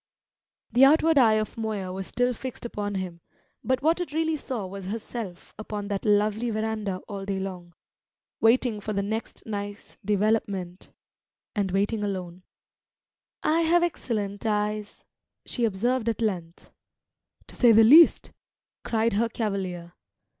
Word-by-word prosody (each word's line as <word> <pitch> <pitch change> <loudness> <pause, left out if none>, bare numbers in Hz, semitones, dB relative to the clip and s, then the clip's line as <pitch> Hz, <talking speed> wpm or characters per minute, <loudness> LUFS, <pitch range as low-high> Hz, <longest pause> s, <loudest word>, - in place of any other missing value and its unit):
The 250 - +5
outward 315 +2 +6
eye 225 -4 +5
of 215 +1 -2
Moya 205 -4 -3
was 190 0 -5
still 245 0 0
fixed 255 +1 -7
upon 205 -3 -4
him, 180 -3 -5 0.4
but 260 +3 0
what 330 +3 +2
it 355 - -4
really 320 0 +1
saw 255 -8 -4
was 195 0 -8
herself 210 -2 -6
upon 210 -1 -5
that 200 -1 -3
lonely 210 +3 +2
verandah 215 -3 -2
all 200 -3 -6
day 195 0 -2
long 180 -3 -6 0.6
waiting 225 -1 +3
for 215 +1 -4
the 200 0 0
next 220 +3 -4
nice 205 -1 -6
development 200 -3 -1 0.7
and 200 -3 0
waiting 205 +3 0
alone. 185 -3 -4 1.0
"I 320 +2 +3
have 340 +1 +3
excellent 210 - -2
eyes," 210 -1 -2 0.4
she 240 - -1
observed 230 +3 0
at 225 - -2
length. 175 -6 -4 0.7
"To - - -14
say 240 -2 +6
the 225 0 +7
least!" 305 +9 +7 0.5
cried 225 -1 +1
her 230 +3 +1
cavalier. 190 -6 -3
210 Hz, 140 wpm, -26 LUFS, 195-235 Hz, 1.0 s, the